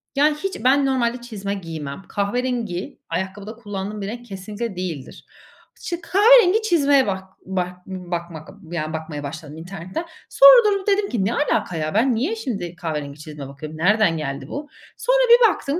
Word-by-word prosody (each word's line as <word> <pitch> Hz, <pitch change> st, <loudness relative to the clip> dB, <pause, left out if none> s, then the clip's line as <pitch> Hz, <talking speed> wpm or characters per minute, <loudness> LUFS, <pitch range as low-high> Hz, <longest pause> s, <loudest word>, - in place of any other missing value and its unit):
Yani, 295 Hz, +2 st, +4 dB
hiç 390 Hz, +5 st, -5 dB
ben 275 Hz, +2 st, +4 dB
normalde 250 Hz, -2 st, 0 dB
çizme 205 Hz, -4 st, -5 dB
giymem. 160 Hz, -6 st, -6 dB
Kahverengi, 220 Hz, -2 st, -2 dB
ayakkabıda 190 Hz, +5 st, -4 dB
kullandığım 205 Hz, -2 st, -5 dB
bir 195 Hz, -, -3 dB
renk 240 Hz, +3 st, -6 dB
kesinlikle 205 Hz, +1 st, -6 dB
değildir. 170 Hz, -7 st, -6 dB, 0.6 s
İşte, 345 Hz, -1 st, -4 dB
kahverengi 420 Hz, +3 st, +6 dB
çizmeye 285 Hz, -, +3 dB
bak 190 Hz, -1 st, -2 dB, 0.2 s
bak 180 Hz, -1 st, -4 dB
b 185 Hz, -2 st, -8 dB
bakmak, 170 Hz, -2 st, -5 dB, 0.2 s
yani, 155 Hz, -2 st, -3 dB
bakmaya 155 Hz, -2 st, -5 dB
başladım 150 Hz, +1 st, -7 dB
internetten. 185 Hz, -, -6 dB, 0.2 s
Sonra -, -, +8 dB
durdum 400 Hz, -2 st, +1 dB
dedim 405 Hz, 0 st, +2 dB
ki: 210 Hz, -6 st, 0 dB
"Ne 225 Hz, -, 0 dB
alaka, 215 Hz, -, 0 dB
ya? 155 Hz, 0 st, -2 dB
Ben 240 Hz, +3 st, +3 dB
niye 290 Hz, -, 0 dB
şimdi 195 Hz, -, -4 dB
kahverengi 150 Hz, -4 st, -5 dB
çizme 150 Hz, -2 st, -8 dB
bakıyorum? 155 Hz, +3 st, -9 dB
Nereden 195 Hz, 0 st, +3 dB
geldi 140 Hz, -3 st, -4 dB
bu?" 290 Hz, -, -6 dB, 0.3 s
Sonra -, -, +2 dB
bir 475 Hz, -1 st, +8 dB
baktım, 295 Hz, -4 st, -2 dB
200 Hz, 165 wpm, -22 LUFS, 165-275 Hz, 0.6 s, Sonra